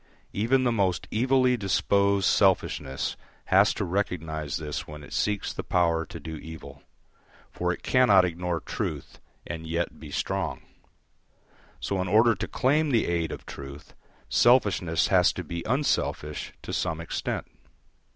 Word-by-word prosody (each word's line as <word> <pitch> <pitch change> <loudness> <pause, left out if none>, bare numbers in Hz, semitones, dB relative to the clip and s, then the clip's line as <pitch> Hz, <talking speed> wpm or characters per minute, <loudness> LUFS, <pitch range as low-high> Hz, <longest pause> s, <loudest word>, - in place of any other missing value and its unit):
Even 125 +6 +2
the 120 - +2
most 95 -6 0
evilly 125 +2 +3
disposed 100 -1 +2
selfishness 90 -10 +1 0.3
has 100 +2 +5
to 100 - -2
recognise 80 -5 -2
this 75 -2 -5
when 75 -1 -9
it - - -11
seeks 105 -1 -1
the - - -4
power 85 -2 +1
to 85 - -8
do 80 +1 -7
evil; 80 +1 -10 0.7
for 90 0 -1
it - - -6
cannot 105 -8 +5
ignore 90 0 -2
truth - - -5 0.3
and 80 -1 -6
yet 85 -1 -2
be 75 -1 -10
strong. - - -2 1.2
So 95 -2 -2
in 95 - -2
order 110 +5 +5
to 95 - -4
claim 150 +4 +2
the 120 -5 +2
aid 85 -2 -1
of - - -8
truth, 70 +1 -10 0.3
selfishness 100 -9 +3
has - - +5
to - - -5
be 85 0 -5
unselfish 115 - -1
to - - -6
some 80 -1 -1
extent. 80 - -3
90 Hz, 145 wpm, -27 LUFS, 80-110 Hz, 1.2 s, has